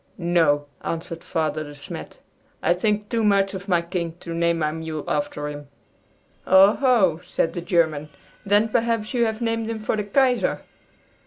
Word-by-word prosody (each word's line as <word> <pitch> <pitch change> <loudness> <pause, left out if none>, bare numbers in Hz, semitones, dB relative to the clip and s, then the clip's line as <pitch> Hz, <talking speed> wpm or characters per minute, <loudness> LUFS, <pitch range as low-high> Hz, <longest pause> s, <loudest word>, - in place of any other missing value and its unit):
"No," 165 -5 +2 0.2
answered 165 0 -4
Father 155 -2 -1
De 145 -1 -10
Smet, 140 0 -8 0.5
"I - - +4
think 210 +3 0
too 230 0 0
much 200 -1 +3
of 195 +1 -7
my 175 -3 +2
King 170 -1 -3
to 170 - -6
name 170 0 +1
my 155 -2 0
mule 160 -1 -5
after 150 0 -2
him." 145 -1 -7 0.8
"Oh, 190 +2 +7
ho!" 215 - +3
said 165 -1 -1
the 175 - -4
German; 160 -4 +1 0.3
"then 205 +2 +3
perhaps 230 -1 0
you 240 -2 +2
have 220 +1 -3
named 230 -1 -1
him 225 - -3
for 215 - -1
the 210 - -1
Kaiser!" 250 +4 +1
175 Hz, 170 wpm, -23 LUFS, 160-215 Hz, 0.8 s, Oh